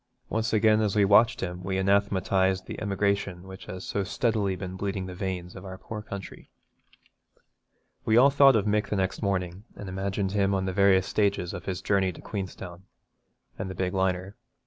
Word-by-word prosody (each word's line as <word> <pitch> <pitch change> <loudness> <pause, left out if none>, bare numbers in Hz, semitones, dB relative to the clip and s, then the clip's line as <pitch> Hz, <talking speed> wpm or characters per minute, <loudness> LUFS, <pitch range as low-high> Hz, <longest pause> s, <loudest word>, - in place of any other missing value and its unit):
Once 110 0 -1
again 110 0 +4
as 105 -2 0
we 105 -1 +4
watched 105 +3 +5
him 90 0 -4
we 95 +1 -2
anathematised 95 -1 +1
the - - -7
emigration 100 -3 -1
which 95 0 -11
has 95 0 -7
so 100 - -1
steadily 100 0 0
been 95 0 -6
bleeding 95 0 -3
the 90 - -7
veins 90 -1 -4
of 95 - -9
our 95 -1 -8
poor 110 +2 -7
country. 100 -2 -9 1.5
We 110 - +3
all 135 +3 +7
thought 140 -2 +6
of 105 -2 +2
Mick 105 0 +1
the - - -1
next 95 -1 -1
morning, 95 -2 -2
and 100 - -8
imagined 95 +1 -2
him 100 -1 +1
on 95 0 -1
the 95 - -2
various 95 -1 +4
stages 100 -4 0
of 90 - -7
his 95 -2 -4
journey 95 -2 +2
to - - -13
Queenstown, 95 -2 -7 0.7
and - - -3
the 95 - -6
big 90 0 -2
liner. 95 +1 -1
95 Hz, 190 wpm, -27 LUFS, 95-100 Hz, 1.5 s, all